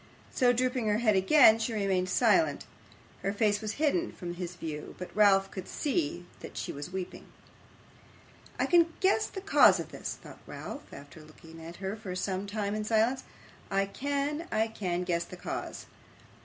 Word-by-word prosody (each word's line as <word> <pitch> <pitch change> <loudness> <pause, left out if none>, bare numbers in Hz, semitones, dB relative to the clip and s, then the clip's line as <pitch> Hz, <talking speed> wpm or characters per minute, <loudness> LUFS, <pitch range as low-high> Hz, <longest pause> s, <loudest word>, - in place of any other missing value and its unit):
So 250 -1 +4
drooping 250 -1 0
her 210 0 +2
head 220 -3 +3
again, 220 +3 +6
she 225 +1 -2
remained 190 -3 0
silent. 245 - +3 0.6
Her 195 - 0
face 205 0 +1
was 215 -1 -3
hidden 315 +4 0
from 175 -2 -6
his 175 0 -6
view, 155 -4 -6
but 180 - -8
Ralph 195 -2 +4
could 190 -2 -7
see 175 - -2
that - - -10
she - - -3
was 145 +5 -7
weeping. 185 -1 -6 1.3
'I - - +1
can 335 -2 +4
guess 395 +3 +3
the 385 - -7
cause 400 - +6
of - - -6
this!' - - -5
thought - - -13
Ralph, 290 - -8
after 145 +3 -11
looking 160 +1 -14
at 165 +1 -9
her 195 +2 -4
for 205 -4 -6
some 190 +1 -2
time 205 -1 -2
in 215 0 -2
silence. 225 +4 +1 0.4
'I 195 0 +1
can 285 +4 -2
I 220 +1 +1
can 180 -5 -2
guess 170 -1 0
the 180 - -11
cause. - - -5
205 Hz, 175 wpm, -30 LUFS, 180-245 Hz, 1.3 s, again